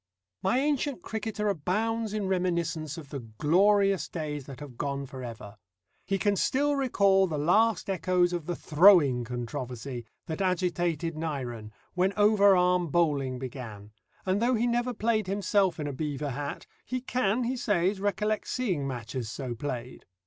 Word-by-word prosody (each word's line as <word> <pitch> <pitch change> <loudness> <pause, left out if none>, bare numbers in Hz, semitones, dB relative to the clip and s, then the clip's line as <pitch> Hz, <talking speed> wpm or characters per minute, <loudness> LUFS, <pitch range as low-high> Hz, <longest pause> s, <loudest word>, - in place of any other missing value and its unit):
My 190 +6 +2
ancient 285 0 0
cricketer 215 -1 -3
abounds 215 +5 -1
in 210 -1 -2
reminiscence 170 -5 -1
of 150 -4 -9
the 140 - -5
glorious 185 - +2
days 150 -4 -5
that 135 -3 -9
have 145 -4 -9
gone 140 +2 -3
for 130 0 -9
ever. 115 -3 -8 0.5
He 195 - +1
can 205 +1 +1
still 285 +8 +1
recall 200 -8 +3
the 155 -3 -3
last 215 +10 +3
echoes 180 -2 +1
of 170 -3 -3
the 175 - -1
"throwing" 155 -8 +5
controversy 120 +1 -5 0.2
that 160 +3 -4
agitated 175 -3 0
Nyren, 130 -9 -4 0.2
when 185 +2 +1
over 205 -1 +6
arm 180 -1 +3
bowling 145 -5 +1
began, 120 -5 -8 0.3
and 190 +2 +1
though 245 +2 +3
he 230 +2 +1
never 240 +1 +1
played 215 -2 0
himself 195 -2 +1
in 150 - -2
a 145 - -3
beaver 145 0 -3
hat, 140 +2 -5 0.2
he 255 - -3
can, 250 -2 0
he 245 +2 -1
says, 200 -5 +1
recollect 210 +2 -1
seeing 185 - -1
matches 120 -2 -4
so 130 0 -4
played. 125 0 -6
175 Hz, 155 wpm, -28 LUFS, 140-205 Hz, 0.5 s, over